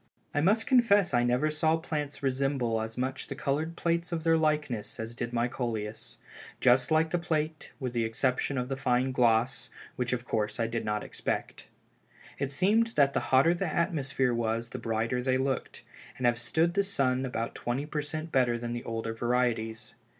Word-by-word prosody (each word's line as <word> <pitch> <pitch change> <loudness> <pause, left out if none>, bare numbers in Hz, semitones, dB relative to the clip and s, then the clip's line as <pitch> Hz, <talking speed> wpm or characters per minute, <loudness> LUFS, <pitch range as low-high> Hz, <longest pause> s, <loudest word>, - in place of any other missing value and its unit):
"I 145 - +1
must 210 +7 +3
confess 205 - +4
I 120 0 +4
never 125 +5 +2
saw 155 +1 +2
plants 150 -3 -4
resemble 130 -4 0
as 110 0 -6
much 130 +1 -2
the 140 - -5
colored 155 +5 -1
plates 170 +1 -1
of 165 -2 -2
their 165 -1 +4
likeness, 150 -9 0
as 115 +1 -4
did 120 0 -4
my 120 0 +1
Coleus; 110 -4 -4 0.4
just 125 0 +4
like 160 0 +3
the 175 - +1
plate 155 -2 -2
with 130 -3 -3
the 120 -1 +1
exception 125 +4 0
of 125 0 -1
the 135 - -2
fine 130 0 +1
gloss, 120 -1 +2 0.3
which 125 -1 -1
of 120 -1 -2
course 105 0 -1
I 115 - +2
did 115 0 -2
not 105 0 -1
expect. - - -4 0.7
It 140 -1 -1
seemed 220 +10 +2
that 140 -1 +4
the - - +2
hotter 135 +6 +5
the 175 +2 -2
atmosphere 140 -7 0
was 115 0 -1
the - - -6
brighter 115 +2 -1
they 130 0 +1
looked, 135 0 -2 0.3
and 125 - -2
have 120 0 +3
stood 160 +8 +1
the 200 - +3
sun 135 -10 +1
about 115 -3 -3
twenty 125 +4 -2
per 150 0 -2
cent 155 +2 -5
better 125 -3 +3
than 120 0 -4
the 120 - -4
older 115 0 -3
varieties. 115 -2 -1
130 Hz, 190 wpm, -29 LUFS, 120-155 Hz, 0.7 s, hotter